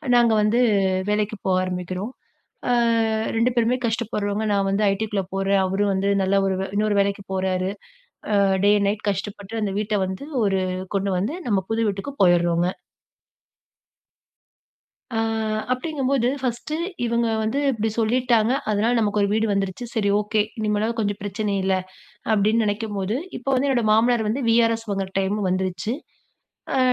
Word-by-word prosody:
நாங்க 235 -2 +5
வந்து 215 +3 +2 0.5
வேலைக்கு 210 +1 0
போக 185 -1 +3
ஆரம்பிக்கிறோம். 185 +4 -4 0.6
அ - - +3 0.7
2 235 +2 +3
பேருமே 235 +1 +2
கஷ்டப்படுறோங்க. 215 -2 -1
நான் 195 -1 +1
வந்து 195 +2 0
ITக்குள்ள 205 0 -1
போறேன். 195 0 +2
அவரும் 200 +2 +1
வந்து 190 +1 0
நல்ல 190 +1 +1
ஒரு 190 - +1
வே - - -1
இன்னொரு 210 0 +1
வேலைக்கு 200 0 0
போறாரு. 185 0 0 0.6
அ - - +4 0.3
டே 205 - +6
அண்ட் 200 - +1
நைட் 210 +1 -3
கஷ்டப்பட்டு, 200 +2 -4
அந்த 200 -2 -1
வீட்ட 210 0 -1
வந்து, 190 +8 -5 0.2
ஒரு 195 -2 +1 0.3
கொண்டு 195 0 0
வந்து, 215 - -2
நம்ம 200 -4 +1
புது 225 -1 +1
வீட்டுக்கு 200 +8 -5
போயிர்றோங்க. 175 -1 +3 2.4
அ 225 - -1 0.5
அப்டிங்கும்போது, 265 -2 0
ஃபர்ஸ்ட்டு 250 +4 -3 0.3
இவங்க 235 0 +1
வந்து 220 +6 0
இப்டி 225 -2 -1
சொல்லிட்டாங்க, 235 0 +2 0.2
அதனால 215 +3 +2
நமக்கு 210 -1 +1
ஒரு 200 - +3
வீடு 220 +1 +1
வந்துருச்சு. 195 +3 -2
சரி 205 -2 +1
ஓகே. 210 +1 +1 0.2
இனிமேலாவது 215 +2 0
கொஞ்சம் 205 -1 -1
பிரச்சனை 205 +1 -2
இல்ல. 190 0 +2 0.6
அப்டின்னு 215 +2 +3
நெனைக்கும்போது, 205 0 -2 0.2
இப்ப 250 - -14
வந்து 265 +2 +2
என்னோட 250 -4 +2
மாமனார் 225 +1 +3
வந்து 240 +6 -1
வி.ஆர்.எஸ் 230 0 +3
வாங்குற 195 -1 -2
டைமும் 195 +1 0
வந்துருச்சு. 185 +4 -1 0.8
அ - - +3
210 Hz, 145 wpm, -23 LUFS, 195-230 Hz, 2.4 s, டே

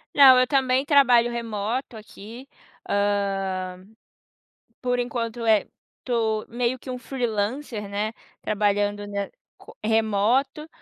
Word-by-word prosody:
Não, 265 -3 +8
eu 255 - +3
também 265 -1 +2
trabalho 245 -5 +5
remoto 230 +1 -3
aqui, 220 +4 -11 0.4
hã, 195 -2 -1 1.0
por 250 -1 0
enquanto 235 -1 -3
é 215 -3 +3 0.4
tô 220 -3 -1
meio 240 +2 -1
que 255 - -12
um 250 - -3
freelancer, 235 -2 -3
né, 205 +2 -2 0.3
trabalhando, 205 0 0
né, 200 -1 -3 0.3
co - - -15
remoto, 225 +7 +1
225 Hz, 110 wpm, -24 LUFS, 205-250 Hz, 1.0 s, Não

